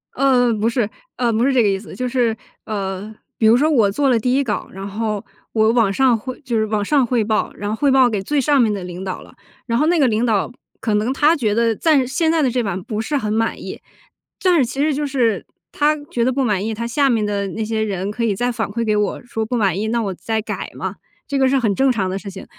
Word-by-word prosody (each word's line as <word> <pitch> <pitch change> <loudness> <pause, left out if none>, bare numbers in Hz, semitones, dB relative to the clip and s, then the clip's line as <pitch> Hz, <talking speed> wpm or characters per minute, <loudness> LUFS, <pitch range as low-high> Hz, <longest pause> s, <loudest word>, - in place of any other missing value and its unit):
呃， 250 -3 +3
不 220 +1 +1
是， 235 -3 0 0.3
呃， 240 -2 +1
不 225 +2 +1
是 275 - +2
这 250 - +4
个 210 - +3
意 195 - +1
思。 205 - -11
就 255 - -2
是， 240 -3 +1 0.3
呃， 200 0 -4 0.2
比 220 - +1
如 225 - +7
说 300 +4 +2
我 225 -10 +3
做 275 +6 +1
了 245 - +4
第 245 +3 0
1 280 - +2
稿， 220 -5 -3
然 195 +1 -7
后 210 0 -3 0.3
我 220 0 +3
往 230 -4 +3
上 250 +2 +3
汇 255 +4 -7
就 245 -4 -2
是 220 - +2
往 215 -1 -1
上 275 +4 +2
汇 235 -2 +1
报， 215 0 0
然 205 - -4
后 215 - -1
汇 280 +4 +2
报 260 -2 +5
给 210 -4 -2
最 290 +9 0
上 280 0 +3
面 215 -3 +2
的 195 - -4
领 180 +1 -7
导 185 -1 -5
了， - - -16 0.3
然 230 -1 0
后 300 - +2
那 345 -1 +3
个 275 - +4
领 225 +1 +1
导 220 -3 +1 0.3
可 220 - -1
能 215 +5 +1
他 300 +4 +4
觉 220 -8 0
得 230 0 +2
暂 285 -1 +2
现 320 +5 +1
在 325 -1 +2
的 265 - +2
这 245 0 0
版 190 -3 -3
不 215 +1 -3
是 290 +6 -1
很 215 -6 -2
满 225 +1 -1
意。 - - -7 0.6
但 365 -2 +4
是 285 - +4
其 265 +3 -6
实 305 0 +2
就 295 +2 -1
是 250 -6 0 0.3
他 300 +1 +2 0.2
觉 235 - 0
得 255 - +2
不 270 +1 0
满 205 -5 0
意， 220 - -2
他 235 +2 -4
下 275 +3 +2
面 225 -4 +1
的 200 -1 -1
那 220 +3 -3
些 220 0 -1
人 195 -2 -2
可 230 +2 -3
以 210 -4 +1
再 245 +4 0
反 230 -2 -2
馈 230 +3 -2
给 215 - +1
我， 210 +2 -1
说 225 -2 -3
不 245 - -3
满 195 -5 +1
意， 220 - -1
那 235 +1 0
我 195 -2 -2
再 220 +5 -2
改 215 - -5
嘛， - - -4 0.3
这 280 -1 -1
个 265 -1 +4
是 275 - +3
很 220 -6 +1
正 265 +5 +3
常 205 -6 -1
的 190 +1 -3
事 200 - -8
情。 190 0 -9
230 Hz, 295 characters per minute, -20 LUFS, 210-260 Hz, 0.6 s, 如